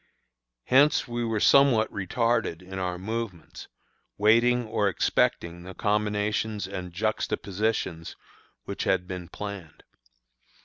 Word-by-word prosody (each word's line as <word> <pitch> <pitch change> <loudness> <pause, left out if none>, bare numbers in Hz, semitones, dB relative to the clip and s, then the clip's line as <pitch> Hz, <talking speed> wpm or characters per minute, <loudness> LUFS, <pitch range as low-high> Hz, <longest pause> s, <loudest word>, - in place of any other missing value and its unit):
Hence 140 - +4
we 120 0 -3
were 115 -2 -1
somewhat 130 -3 +4
retarded 100 -3 -1
in 95 +1 -7
our 90 -1 -2
movements, 100 -3 -6 0.5
waiting 120 +3 +4
or 105 -2 +1
expecting 85 -2 0
the 90 +1 -10
combinations 105 0 -1
and 90 -2 -6
juxtapositions 100 -2 -2 0.5
which - - -5
had 90 -1 +1
been 90 -2 -6
planned. 100 -6 -8
105 Hz, 105 wpm, -26 LUFS, 90-115 Hz, 0.5 s, Hence